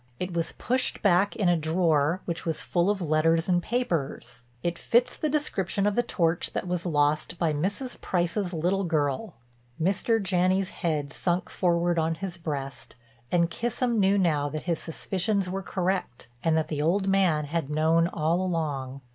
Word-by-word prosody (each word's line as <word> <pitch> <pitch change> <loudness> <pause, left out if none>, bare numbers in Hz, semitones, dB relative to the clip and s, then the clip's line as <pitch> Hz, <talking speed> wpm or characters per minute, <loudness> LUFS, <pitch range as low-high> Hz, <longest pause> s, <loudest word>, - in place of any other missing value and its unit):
It 180 0 -3
was 170 0 -1
pushed 255 +1 0
back 195 0 +3
in 205 -5 +1
a 175 - +4
drawer 160 0 +1
which 170 -1 -4
was 160 -2 -2
full 175 +2 +1
of 205 -2 0
letters 165 +1 +2
and 175 -1 +2
papers. 165 - -3 0.2
It 170 0 -2
fits 245 +1 +2
the 310 - -1
description 205 - -1
of 205 - +2
the 240 - +3
torch 170 -7 0
that - - -3
was 180 0 -2
lost 150 +1 +1
by 165 -3 +1
Mrs. 200 - -3
Price's 180 +1 -1
little 180 +4 0
girl." 160 +3 -1 0.4
Mr. 195 +6 +1
Janney's 185 0 +1
head 150 -5 -2
sunk 175 0 -1
forward 175 -1 +1
on 160 +1 0
his 175 +1 -5
breast, 140 -5 -5 0.4
and 170 -1 +2
Kissam 240 +1 -1
knew 195 0 +4
now 150 -6 +2
that 155 +1 -5
his 170 -2 -1
suspicions 190 +4 -1
were 190 +2 -3
correct 185 - -2
and 160 -1 +3
that 160 - 0
the 150 -2 -2
old 190 +6 +1
man 185 -6 +2
had 155 -1 -2
known 160 +2 +3
all 165 +1 0
along. 145 -7 -2
175 Hz, 170 wpm, -27 LUFS, 160-195 Hz, 0.4 s, a